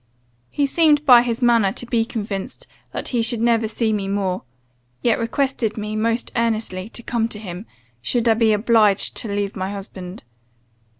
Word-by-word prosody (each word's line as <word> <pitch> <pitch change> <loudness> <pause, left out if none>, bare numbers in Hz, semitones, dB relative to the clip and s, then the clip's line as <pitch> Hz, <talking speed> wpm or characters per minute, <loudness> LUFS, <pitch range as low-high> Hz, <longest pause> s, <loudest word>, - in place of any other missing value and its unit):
He 285 - 0
seemed 300 0 +3
by 250 -4 +8
his 240 0 -2
manner 230 -5 +4
to - - -4
be 230 -2 +1
convinced 205 -4 -5 0.3
that - - -3
he 240 -3 +1
should 230 0 0
never 230 -1 +2
see 220 0 0
me 200 -2 -2
more; 195 -2 -1 0.6
yet 235 -2 +2
requested 230 -2 -1
me, 215 0 -4
most 230 +2 -1
earnestly, 220 -4 -1
to 235 - -7
come 230 -1 0
to 225 - -5
him, 195 0 -8 0.3
should 235 - 0
I 225 - +6
be 220 0 +3
obliged 210 -2 +3
to - - -3
leave 200 0 -2
my 190 0 -3
husband. 190 -2 -8
225 Hz, 175 wpm, -21 LUFS, 205-235 Hz, 0.6 s, by